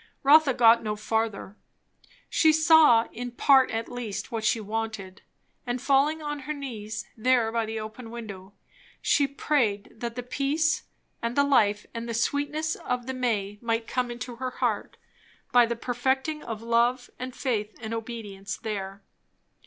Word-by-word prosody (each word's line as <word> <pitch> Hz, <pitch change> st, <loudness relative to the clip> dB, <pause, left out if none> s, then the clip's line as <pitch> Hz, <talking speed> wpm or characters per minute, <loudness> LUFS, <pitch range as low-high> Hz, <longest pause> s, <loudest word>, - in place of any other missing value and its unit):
Rotha 285 Hz, -1 st, +6 dB
got 230 Hz, -1 st, +6 dB
no 215 Hz, -1 st, -2 dB
further. 215 Hz, -1 st, -2 dB, 0.7 s
She 315 Hz, -, +4 dB
saw, 310 Hz, -7 st, +6 dB
in 245 Hz, +2 st, -5 dB
part 265 Hz, +1 st, +5 dB
at 225 Hz, +1 st, -3 dB
least, 245 Hz, -2 st, -5 dB
what 225 Hz, -2 st, -3 dB
she 225 Hz, -, +2 dB
wanted; 215 Hz, -3 st, -5 dB, 0.5 s
and 245 Hz, +1 st, -1 dB
falling 285 Hz, +4 st, +2 dB
on 295 Hz, -1 st, -3 dB
her 295 Hz, +3 st, -4 dB
knees 220 Hz, -7 st, -6 dB
there 235 Hz, -1 st, +2 dB
by 230 Hz, -1 st, -1 dB
the 220 Hz, 0 st, -3 dB
open 220 Hz, +2 st, -8 dB
window, 205 Hz, -5 st, -8 dB, 0.5 s
she 285 Hz, -1 st, +2 dB
prayed 250 Hz, -7 st, 0 dB
that 235 Hz, 0 st, -4 dB
the 245 Hz, -, -4 dB
peace 290 Hz, +5 st, 0 dB, 0.4 s
and 235 Hz, +1 st, -2 dB
the 285 Hz, -, +4 dB
life 210 Hz, -7 st, +3 dB
and 230 Hz, 0 st, -5 dB
the 230 Hz, -, -2 dB
sweetness 290 Hz, +7 st, 0 dB
of 250 Hz, -1 st, -3 dB
the 260 Hz, -, -3 dB
May 210 Hz, -5 st, -1 dB
might 230 Hz, -1 st, -1 dB
come 250 Hz, 0 st, -1 dB
into 240 Hz, 0 st, -6 dB
her 255 Hz, +1 st, -3 dB
heart, -, -, -2 dB, 0.5 s
by 245 Hz, -1 st, +6 dB
the 235 Hz, -, -2 dB
perfecting 265 Hz, +6 st, -1 dB
of 225 Hz, -1 st, -6 dB
love 235 Hz, +2 st, +1 dB
and 255 Hz, 0 st, -6 dB
faith 215 Hz, -5 st, -2 dB
and 225 Hz, -1 st, -5 dB
obedience 210 Hz, -4 st, -6 dB
there. 195 Hz, -2 st, -5 dB
235 Hz, 160 wpm, -27 LUFS, 220-265 Hz, 0.7 s, Rotha